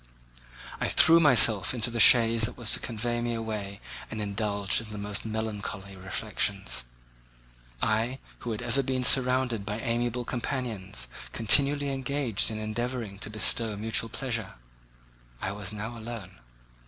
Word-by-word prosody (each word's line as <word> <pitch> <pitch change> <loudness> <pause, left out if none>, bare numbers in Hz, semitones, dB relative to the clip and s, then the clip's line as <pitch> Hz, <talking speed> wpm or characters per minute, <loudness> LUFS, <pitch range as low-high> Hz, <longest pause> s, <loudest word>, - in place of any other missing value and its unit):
I - - -1
threw 165 +1 +6
myself 120 -7 +5
into 120 0 +1
the 120 - -3
chaise 115 +1 +6
that 110 - -6
was 120 -3 +4
to - - +4
convey 120 +1 -3
me 120 0 -2
away 105 -3 -5 0.3
and 110 - -6
indulged 100 0 0
in 115 - -10
the 105 - -7
most 105 0 -3
melancholy 105 -3 -5
reflections. 90 -8 -2 1.0
I, 115 +4 0 0.2
who 120 - -6
had 115 +2 -4
ever 120 +3 0
been 130 -1 -2
surrounded 125 -4 +4
by 105 +1 -4
amiable 120 +1 -1
companions, 115 - -4 0.3
continually 140 +5 +3
engaged 135 -5 0
in 110 - -5
endeavouring 110 -1 -4
to - - -4
bestow 110 +1 0
mutual 115 +2 -1
pleasure—I - - -8
was 100 -1 -4
now 105 +3 -6
alone. 110 - -8
110 Hz, 140 wpm, -27 LUFS, 100-120 Hz, 1.0 s, threw